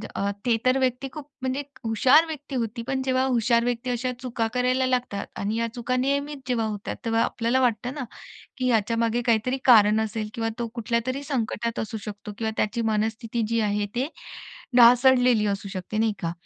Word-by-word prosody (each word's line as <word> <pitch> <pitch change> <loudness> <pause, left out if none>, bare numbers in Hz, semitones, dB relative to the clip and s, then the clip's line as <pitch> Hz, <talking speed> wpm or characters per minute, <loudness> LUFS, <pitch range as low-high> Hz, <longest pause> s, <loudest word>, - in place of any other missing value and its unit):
अ, 200 - 0 0.2
ते 240 -2 +3
तर 255 +1 +4
व्यक्ती 260 +1 0
खूप 300 -3 -8
म्हणजे 260 +2 -1 0.2
हुशार 255 +8 +5
व्यक्ती 295 -3 -7
होती. 235 -1 -2
पण 265 +2 -2
जेव्हा 260 0 +1
हुशार 235 -2 +2
व्यक्ती 245 +1 -2
अशा 250 +1 -1
चुका 240 -3 -2
करायला 255 +1 +1
लागतात 250 -6 -1
आणि 205 +2 -1
या 230 - 0
चुका 250 0 -2
नियमित 280 +3 -1
जेव्हा 240 -3 0
होतात, 210 0 -4
तेव्हा 225 0 +2
आपल्याला 235 +3 0
वाटतं 245 +1 0
ना, 285 -2 -4 0.6
की 255 -1 0
ह्याच्यामागे 230 +1 +1
काहीतरी 235 +2 +2
कारण 215 -3 +6
असेल 220 0 -3
किंवा 225 -1 -1
तो 235 - -2
कुठल्यातरी 235 +3 -2
संकटात 235 -4 -2
असू 220 0 -3
शकतो 210 0 -7
किंवा 220 -1 -1
त्याची 225 +2 0
मनस्थिती 220 +2 -1
जी 230 0 +1
आहे, 205 -1 0
ते 255 +4 -1 0.7
ढासळलेली 245 -2 +6
असू 200 0 -2
शकते 195 +2 -5
नाही 220 0 +2
का. 165 -1 -1
235 Hz, 180 wpm, -25 LUFS, 220-255 Hz, 0.7 s, कारण